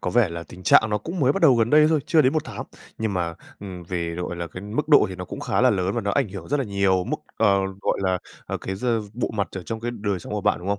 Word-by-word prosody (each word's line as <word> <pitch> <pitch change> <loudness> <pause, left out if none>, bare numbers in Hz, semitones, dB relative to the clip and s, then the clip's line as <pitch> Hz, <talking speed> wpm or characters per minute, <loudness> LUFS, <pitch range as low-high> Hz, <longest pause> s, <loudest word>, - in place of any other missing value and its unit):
có - - -2
vẻ 120 -5 +3
là 85 0 -6
tình 90 +2 -13
trạng 110 +4 +5
nó 105 - +1
cũng 165 - -5
mới 135 0 +4
bắt 195 - -3
đầu 145 -6 +7
gần 115 0 +2
đây 150 0 +7
thôi, 155 -2 +2
chưa 160 -3 +4
đến 130 - +3
1 155 - 0
tháng. - - -6 0.4
Nhưng 110 -2 -1
mà, 85 -2 -1 0.3
ừm, 95 -3 -7
về, 85 -1 -3
gọi 90 0 -4
là, 85 0 -4
cái 90 +3 -9
mức 110 +10 -3
độ 150 - +7
thì 95 - -6
nó 90 0 -6
cũng - - -7
khá - - 0
là 130 +1 +5
lớn, 95 -2 0
và - - 0
nó 100 - -1
ảnh 100 - +1
hưởng 95 -3 -8
rất 145 - +1
là 140 - -1
nhiều 100 -3 +1
mức, - - -2 0.2
ờ, 100 -1 +4 0.2
gọi - - 0
là, 95 -1 +1 0.4
cái 95 - -4
d 100 - -8 0.3
bộ 120 - -2
mặt 100 - 0
ở 95 - -5
trong 115 +4 -5
cái 120 +1 -2
đời 100 -3 -1
sống 85 - -9
của 105 - -1
bạn, - - +2
đúng 90 +3 -7
không? 100 0 0
100 Hz, 310 wpm, -24 LUFS, 90-120 Hz, 0.4 s, đầu